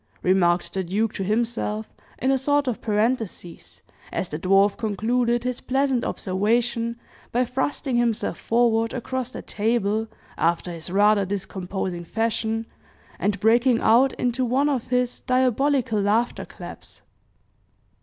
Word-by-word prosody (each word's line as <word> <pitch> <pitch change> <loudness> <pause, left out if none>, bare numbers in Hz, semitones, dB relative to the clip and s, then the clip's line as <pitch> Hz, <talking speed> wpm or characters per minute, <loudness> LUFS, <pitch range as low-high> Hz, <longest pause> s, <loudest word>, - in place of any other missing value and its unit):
remarked 180 -2 +2
the 190 - -1
duke 205 +5 -1
to 195 - -3
himself, 220 0 -1 0.2
in 260 - +1
a 270 - +3
sort 285 +1 +2
of 245 - -2
parenthesis, 215 -5 -2 0.3
as 185 - -2
the 150 - -4
dwarf 195 +3 +4
concluded 235 +3 0
his 250 -1 -2
pleasant 265 -1 +1
observation 230 +4 0 0.3
by 250 +2 +2
thrusting 265 +1 -1
himself 235 -2 0
forward 230 0 +2
across 255 0 -3
the - - -8
table, 220 0 0 0.3
after 170 +1 +1
his 165 0 -7
rather 205 +2 +4
discomposing 190 -2 -4
fashion, 225 +3 -1 0.5
and 205 -1 0
breaking 235 +2 +4
out 245 +4 +4
into 250 +1 -1
one 265 +4 +2
of 260 -5 -1
his 250 -1 0
diabolical 255 -2 +1
laughter 220 +4 +1
claps. - - -11
225 Hz, 130 wpm, -24 LUFS, 205-250 Hz, 0.5 s, dwarf